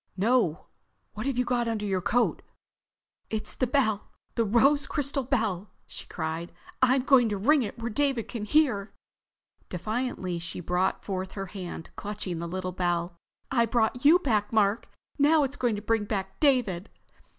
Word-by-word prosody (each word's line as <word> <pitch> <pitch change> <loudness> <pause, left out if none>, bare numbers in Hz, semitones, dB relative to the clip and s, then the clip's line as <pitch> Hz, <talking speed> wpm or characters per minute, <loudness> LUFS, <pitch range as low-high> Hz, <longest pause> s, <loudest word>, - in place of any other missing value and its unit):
"No! 210 -5 +2 0.5
What 215 +5 -4
have 270 -3 -1
you 250 - +2
got 240 -1 0
under 220 -2 -1
your 190 -2 0
coat?" 230 +6 +1 0.9
"It's 215 -1 -3
the 255 - 0
bell, 220 -6 +1 0.2
the 230 - +1
rose 270 +6 +3
crystal 280 -2 -1
bell!" 220 -7 -1 0.2
she - - -7
cried. 160 +1 -4 0.3
"I'm 260 0 +4
going 255 -4 +5
to 205 - -1
ring 285 +9 +4
it 210 -5 -4
where 230 0 -4
David 270 -1 0
can 225 -4 -5
hear!" 220 -6 +2 0.7
Defiantly 190 -2 -3
she 170 +1 -6
brought 180 +2 0
forth 190 -1 -3
her 195 -1 -4
hand, 180 -4 -7
clutching 200 -4 -4
the 170 - -4
little 185 +1 -3
bell. 175 -1 -1 0.4
"It 235 -3 +3
brought 235 +1 +1
you 310 +5 +8
back, 215 - 0
Mark! 215 0 +2 0.3
Now 300 +2 +5
it's 270 0 -1
going 240 -5 0
to 205 - -6
bring 225 -1 +1
back 195 -2 -4
David!" 240 - +2
220 Hz, 165 wpm, -27 LUFS, 190-255 Hz, 0.9 s, you